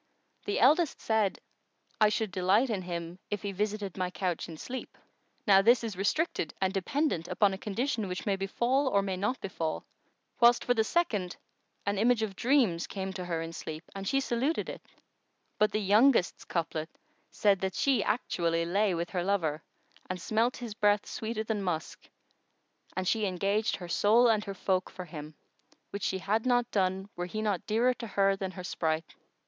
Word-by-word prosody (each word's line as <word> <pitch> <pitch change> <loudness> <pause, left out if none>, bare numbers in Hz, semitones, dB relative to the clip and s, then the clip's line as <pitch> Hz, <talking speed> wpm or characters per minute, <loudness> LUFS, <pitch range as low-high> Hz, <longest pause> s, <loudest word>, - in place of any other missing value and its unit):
the 205 - 0
eldest 300 +5 +4
said, 220 -3 +1 0.6
'I 215 -1 +6
should 215 -1 -1
delight 200 +7 +2
in 200 -3 -1
him, 170 0 -5
if 205 -1 -3
he 200 - -2
visited 205 -1 -2
my 185 -1 -1
couch 180 -2 -3
in 160 - -8
sleep.' 255 +9 -7 0.5
Now 195 -2 +7
this 235 +4 +5
is 220 -4 -3
restricted 200 - -1
and 190 0 +1
dependent 195 - 0
upon 200 +1 +2
a - - -4
condition 220 +1 -2
which 180 0 -5
may 200 - +2
befal 240 +8 0
or 200 -6 +2
may 190 -1 -2
not 205 +8 -1
befal; 165 -5 -3 0.5
whilst, 240 0 +5
for 245 - +3
the 225 -2 +2
second, 215 - 0 0.5
an 200 0 0
image 230 0 +3
of 200 -3 -3
dreams 235 -10 +2
came 190 -1 -4
to 185 -1 -5
her 165 -2 -2
in 165 0 -7
sleep, 160 0 -6
and 195 0 -6
she 275 - +2
saluted 265 +5 -1
it; - - -7 0.8
but 215 0 +4
the - - 0
youngest's 210 0 +3
couplet 165 -2 -2 0.4
said 200 -2 +2
that 190 -1 -2
she 260 -7 +2
actually 170 -6 0
lay 195 +2 +1
with 170 +1 -3
her 180 -2 -1
lover 165 -6 0 0.5
and 185 0 -3
smelt 225 +7 +1
his 240 -3 -6
breath 205 0 +2
sweeter 220 0 -3
than 215 -2 -2
musk 175 -5 -4 0.9
and 185 0 -1
she 215 0 +2
engaged 200 +4 0
her 180 - -8
soul 215 +7 +4
and 215 -2 +2
her 195 -1 -5
folk 185 0 0
for 185 - -8
him, 155 -2 -9 0.6
which 200 - -5
she 190 - 0
had 210 +4 0
not 245 -2 +2
done, 190 -1 0
were 175 0 -3
he 215 +4 -4
not 210 -5 -1
dearer 235 +4 +3
to 235 -1 -7
her 195 -1 +2
than 195 -1 -4
her 185 -1 -8
sprite." 160 -2 -2
200 Hz, 185 wpm, -30 LUFS, 185-225 Hz, 0.9 s, Now